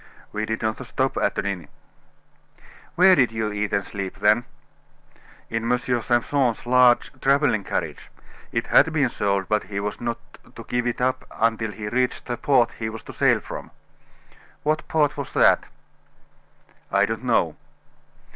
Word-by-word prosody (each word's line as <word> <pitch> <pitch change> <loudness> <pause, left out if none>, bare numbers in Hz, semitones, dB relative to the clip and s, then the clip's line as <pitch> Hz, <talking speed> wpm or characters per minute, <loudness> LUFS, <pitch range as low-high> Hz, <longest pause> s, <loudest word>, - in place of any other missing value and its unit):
"We 105 0 -3
did 110 0 -3
not 110 +4 -2
stop 130 +2 -1
at - - 0
an - - -1
inn." 95 -6 -3 1.3
"Where 185 +2 +7
did 125 -8 +3
you 110 -1 -2
eat 105 0 -2
and 100 - 0
sleep, 95 -2 -5
then?" 105 +3 +3 1.0
"In 115 +1 -2
M. 125 - +4
Simpson's 120 +1 0
large 125 0 +4
traveling 140 -6 +2
carriage; - - -4 0.4
it - - -1
had 160 - +5
been 140 -5 +2
sold, 100 -3 -1
but 105 -2 0
he 100 +1 -4
was 105 +1 -4
not 120 -1 -2 0.4
to - - -9
give 125 0 -1
it 120 - -2
up 130 +1 0
until 115 -1 0
he 105 0 -7
reached 125 +3 -1
the 120 - -3
port 125 -2 +2
he 110 -1 -2
was 110 0 -8
to - - -10
sail - - +3
from." - - -8 0.9
"What 155 +1 0
port 150 -2 +1
was 140 -2 -6
that?" - - +4 1.2
"I 100 +1 +4
don't 115 +3 -4
know." 115 -10 +1
115 Hz, 160 wpm, -23 LUFS, 105-125 Hz, 1.3 s, Where